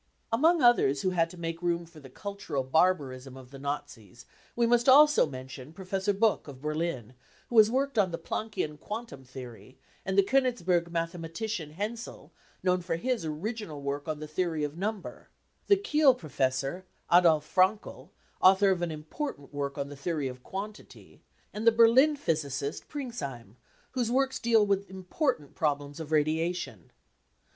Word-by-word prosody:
Among 320 +6 +4
others 145 - +4
who 185 - +1
had 165 -2 +1
to 180 - -12
make 165 0 -4
room 170 -1 0
for 165 -1 -15
the 135 -3 -13
cultural 200 -4 -4
barbarism 135 -4 0
of 130 -1 -13
the 135 - -10
Nazis 135 -7 -6 0.3
we 235 - +2
must 240 +2 +3
also 295 - +7
mention 130 +1 -9
Professor 190 +2 -2
Buck 210 -1 +1
of 135 -3 -10
Berlin, 150 -6 -3 0.4
who 235 - +5
has 215 0 +7
worked 270 0 0
on 190 -3 +3
the 165 - -4
Planckian 165 -10 -4
quantum 210 - -7
theory; 125 0 -11 0.3
the 195 +1 +3
Konigsberg 190 -9 +1
mathematician 165 +1 -4
Hensel, 220 +6 -6 0.3
known 180 -1 +2
for 170 -1 -2
his 235 +2 -2
original 160 +1 -4
work 140 +1 -4
on 155 -1 -3
the 155 - -6
theory 160 0 -1
of 145 0 -3
number; 205 +2 -5 0.4
the 400 - +6
Kiel 300 -9 +4
pro 165 -11 -11
fessor 135 +6 -1 0.3
Adolf 165 -4 +5
Frankel, 190 +5 0 0.3
author 195 +1 +6
of 180 -2 0
an 175 - -1
important 155 - -6
work 140 0 -3
on 140 0 -3
the 145 - -8
theory 145 0 -2
of 125 -1 -8
quantity; 205 +8 -9 0.3
and 215 +2 -3
the - - +9
Berlin 235 +6 +5
physicist 145 - -2
Pringsheim, 140 - -6 0.4
whosd 245 -3 0
works 265 +2 +1
deal 225 -2 +4
with 200 0 0
important 190 - -2
problems 145 -1 -2
of 160 -1 -7
radiation. 155 - -1
170 Hz, 160 wpm, -29 LUFS, 145-220 Hz, 0.4 s, the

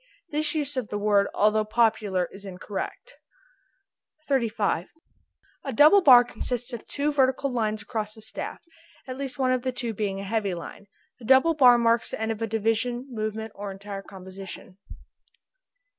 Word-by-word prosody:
This 305 +2 0
use 290 -2 -2
of 250 -4 -2
the 205 - -3
word, 205 -1 +2
although 215 +1 +3
popular, 215 -4 +1
is 195 - -10
incorrect. 195 - -7 1.1
35. 220 - 0 0.8
A - - -4
double 310 +7 +7
bar 250 -7 +8
consists 245 +1 -4
of 235 - -7
two 290 +1 -1
vertical 265 0 +1
lines 215 -3 -1
across 215 -1 -4
the 220 - -13
staff, 220 - -5 0.5
at 255 - -5
least 270 -2 -6
one 260 -2 +1
of 255 -1 +1
the 255 +1 -2
two 240 -2 -3
being 195 -2 -3
a - - -5
heavy 200 -2 -1
line. 175 +4 -9 0.3
The 235 - -11
double 265 +7 +5
bar 250 -5 +6
marks 230 0 +2
the - - -5
end 220 0 -1
of 220 0 -5
a 225 - 0
division, 225 +3 -1
movement, 220 -1 -4
or 205 0 -6
entire 195 +1 -7
composition. 190 -1 -11
225 Hz, 165 wpm, -26 LUFS, 205-255 Hz, 1.1 s, bar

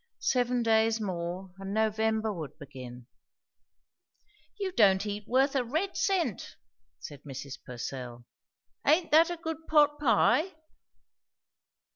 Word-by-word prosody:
Seven 245 -1 +1
days 225 0 +3
more, 180 -1 -4
and 195 +1 -5
November 220 0 +1
would 155 -7 -7
begin! 130 -4 -10 1.5
"You 390 -2 -2
don't 200 - +4
eat 205 0 -5
worth 270 +3 +2
a 265 - +2
red 320 +11 -2
cent!" 385 -3 -1 0.4
said 145 -4 -10
Mrs. 140 0 -8
Purcell. 120 -1 -7 0.6
"Aint 325 +4 +3
that 325 +3 +6
a 350 - -4
good 320 -1 -6
pot 295 -1 +4
pie?" 300 - +3
220 Hz, 115 wpm, -29 LUFS, -, 1.5 s, that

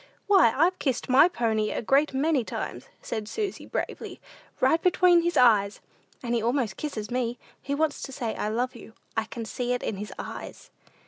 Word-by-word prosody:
"Why, 385 - +5
I've 355 +5 +3
kissed 265 -3 -1
my 265 +6 +7
pony 220 -9 0
a - - -3
great 275 +6 +3
many 280 0 +1
times," - - -6 0.2
said 215 -2 -4
Susy, 415 - -4
bravely, - - -5 0.4
"right 325 - +3
between 360 -1 +5
his 345 +1 -1
eyes; 210 -5 +4 0.4
and 240 -1 -2
he 235 - +1
almost 235 -2 0
kisses 220 -8 -5
me. 245 -1 -1 0.2
He 280 - -2
wants 305 0 0
to 270 - -6
say, 240 -4 -3
'I - - -3
love 245 +4 -1
you.' 225 -1 -12 0.2
I 220 -1 0
can 230 +1 -7
see 245 +2 -2
it 245 - -3
in 205 - -3
his 210 +2 -6
eyes." - - -8
250 Hz, 190 wpm, -26 LUFS, 225-305 Hz, 0.4 s, my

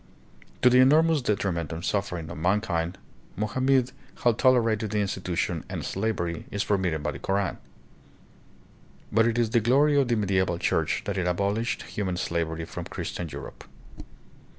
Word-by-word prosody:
To 125 - +8
the 125 - +6
enormous 155 +4 +5
detriment 95 - -1
and 80 +1 -5
suffering 90 -5 -2
of - - -7
mankind, 90 -1 0 0.4
Mohammed 130 +5 +1 0.3
had 120 -2 +3
tolerated 115 -4 +3
the 105 0 -1
institution, 95 -3 -2
and - - -4
slavery 95 -5 -2
is 100 +1 -1
permitted 90 -7 0
by - - -1
the - - -8
Koran. 95 -1 -1 1.5
But 115 +2 +4
it 115 0 0
is 115 -2 +1
the 120 - +4
glory 140 +5 +4
of 135 - 0
the 120 - +2
medieval 95 -4 +1
church 85 - 0
that 100 -2 -2
it 90 - 0
abolished 100 +6 -1
human 95 -4 -3
slavery 85 -2 -2
from - - -7
Christian 85 -2 -5
Europe. - - -9
100 Hz, 150 wpm, -26 LUFS, 90-120 Hz, 1.5 s, To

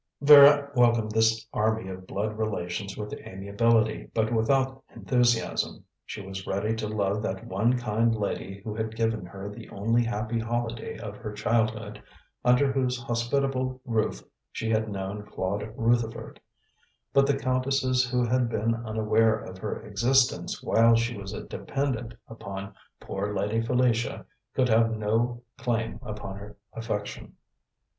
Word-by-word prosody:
Vera 145 0 +8
welcomed 120 -4 +3
this 110 0 +2
army 110 -1 0
of 95 0 -8
blood 105 +2 -2
relations 100 -2 -3
with 105 0 -5
amiability, 110 +3 0
but 110 +1 +1
without 130 +3 +1
enthusiasm. 120 -3 +1 0.2
She 100 - -7
was 95 0 -7
ready 105 +3 0
to 110 -1 -2
love 105 -1 0
that 95 -3 -4
one 115 +7 +1
kind 115 -1 +1
lady 100 -2 -4
who 110 - -4
had 110 0 -3
given 110 -5 -1
her 95 +2 -8
the 105 - -9
only 115 +4 +1
happy 115 0 -2
holiday 120 0 -3
of 105 -2 -7
her 105 - -6
childhood, 110 -1 -1 0.4
under 125 +3 +4
whose 130 -2 0
hospitable 130 +2 -1
roof 115 -3 -1 0.3
she 115 0 -3
had 110 0 +1
known 100 +1 -4
Claude 105 +1 -3
Rutherford; 115 0 0 0.7
but 140 0 +5
the 140 -1 +2
countesses 130 -1 +1
who 125 0 +1
had 125 0 +1
been 115 0 0
unaware 110 -1 +2
of 95 -3 -9
her 105 +2 -4
existence 120 +5 +1
while 115 +1 +5
she 120 +1 0
was 100 -1 -7
a 105 - -6
dependant 125 -5 -3
upon 100 -3 -7 0.3
"poor 100 +1 -4
Lady 105 +3 0
Felicia," 120 -1 +1 0.3
could 130 -1 +3
have 115 0 +3
no 115 +3 0 0.2
claim 115 -3 -1
upon 105 -5 -6
her 100 +1 -11 0.2
affection. 110 -3 -5
115 Hz, 145 wpm, -27 LUFS, 105-120 Hz, 0.7 s, Vera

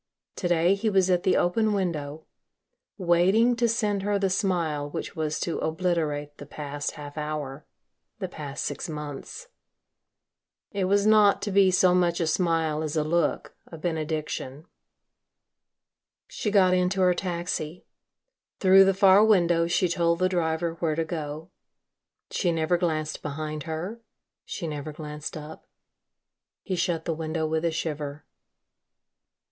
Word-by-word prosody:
To 180 - -1
day, 175 +1 +3
he 210 +3 0
was 190 -2 +3
at 180 -1 +3
the 185 - +2
open 215 +5 +2
window, 160 -6 -3 0.7
waiting 190 +6 +3
to 235 0 +3
send 210 -3 0
her 205 +1 0
the 195 -1 0
smile 170 -7 0
which - - -6
was 155 -1 -2
to 170 - -2
obliterate 155 -3 -1
the 145 - -9
past 145 -1 -5
half 145 0 -8
hour, 150 -1 -5 0.5
the 195 -4 -4
past 150 -5 -6
six 180 - -4
months. 150 - -7 1.2
It 195 -3 -1
was 200 +2 +2
not 215 -2 +5
to 205 - -2
be 195 -1 +5
so 185 0 +4
much 175 -1 +2
a 170 - +1
smile 160 -2 +1
as 155 -1 -3
a 155 - +2
look, 160 0 -1
a 165 - -10
benediction. 155 -3 -3 1.6
She 215 - -3
got 190 -3 +4
into 185 +1 +1
her 180 -1 +5
taxi. 175 -2 -4 0.7
Through 195 0 +7
the 195 0 +2
far 195 +1 +6
window 175 -6 +3
she 180 +1 +2
told 170 0 +1
the 185 +1 +2
driver 165 -2 0
where 160 -3 0
to 165 0 -1
go. 155 0 -6 0.8
She 175 - +1
never 165 +1 +1
glanced 155 -3 -1
behind 155 +1 -4
her, 180 +9 -4 0.4
she 175 - -5
never 150 0 -5
glanced 150 0 -7
up. 155 +1 -10 1.0
He 190 - -2
shut 170 -2 -1
the 165 - 0
window 160 0 -2
with 160 +1 -1
a 170 - +2
shiver. 150 -2 -4
170 Hz, 145 wpm, -26 LUFS, 155-185 Hz, 1.6 s, Through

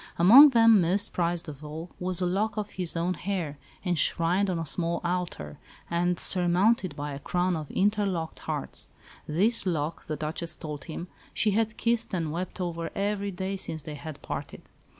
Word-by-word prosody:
Among 245 - +9
them, 230 -5 +6
most 185 +4 0
prized 175 -1 -1
of 150 -1 -9
all, 160 +3 -7
was 180 0 -2
a - - +2
lock 205 +4 -1
of 210 -1 -3
his 180 -2 -1
own 175 +2 0
hair, 175 -6 -4 0.3
enshrined 175 +2 +2
on 180 - -1
a 165 - -3
small 170 +2 0
altar, 175 - -3 0.3
and 175 0 +1
surmounted 185 0 +3
by 145 0 -4
a 140 - -6
crown 180 +4 0
of 155 -3 -5
interlocked 195 -5 0
hearts. - - -4 0.4
This 200 +8 +4
lock, 160 -2 -2
the 155 - -2
Duchess 155 +2 -3
told 150 -3 -7
him, 170 +2 -6 0.3
she 215 - +2
had 220 +1 0
kissed 230 -4 0
and 165 -4 -2
wept 180 +4 -5
over 170 -2 -3
every 200 0 -1
day 190 +1 -3
since 160 -5 -2
they 150 - -7
had 150 0 -8
parted. - - -7
175 Hz, 175 wpm, -27 LUFS, 160-195 Hz, 0.4 s, Among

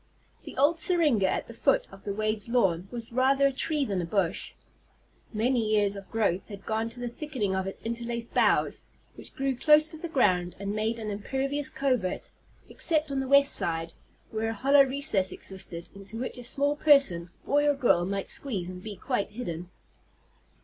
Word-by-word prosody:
The - - -10
old 295 +5 +3
syringa 305 - +3
at - - -2
the - - -11
foot - - +1
of 195 - -14
the 205 - -2
Wade's 215 0 -1
lawn 195 -7 +1
was 235 -1 -6
rather 270 +2 +3
a 275 - +4
tree 295 +2 -1
than 195 -6 -2
a - - -3
bush. 180 -1 -2 0.8
Many 235 +2 +1
years 210 -2 +2
of 195 -1 -10
growth 200 -5 0
had 200 -2 -10
gone 220 +1 -1
to 240 +2 -11
the 245 - -3
thickening 240 -6 -3
of 190 0 -2
its 195 - -5
interlaced 235 0 -4
boughs, - - +2 0.3
which - - -14
grew 270 -1 -1
close 305 +4 +5
to 320 - -7
the 340 - -5
ground, 180 - +1
and 200 +1 -4
made 220 +2 -1
an 215 -2 -5
impervious 270 +7 -2
covert, 255 -8 -1 0.4
except 310 -3 -1
on 275 - -1
the 265 - -3
west 280 +1 +5
side, 165 0 +2 0.4
where 220 0 -2
a - - -2
hollow 275 +5 +5
recess 265 -9 +2
existed, 175 -3 -5
into 200 +2 -10
which 255 +1 -4
a - - -8
small 285 +4 +1
person, 275 - +4 0.2
boy 290 +1 +2
or 290 - +2
girl, 240 -10 +3
might 195 +2 -3
squeeze 200 -11 -1
and 180 0 -8
be 210 +1 -7
quite 225 -2 -2
hidden. 175 -7 -6
230 Hz, 190 wpm, -27 LUFS, 195-275 Hz, 0.8 s, close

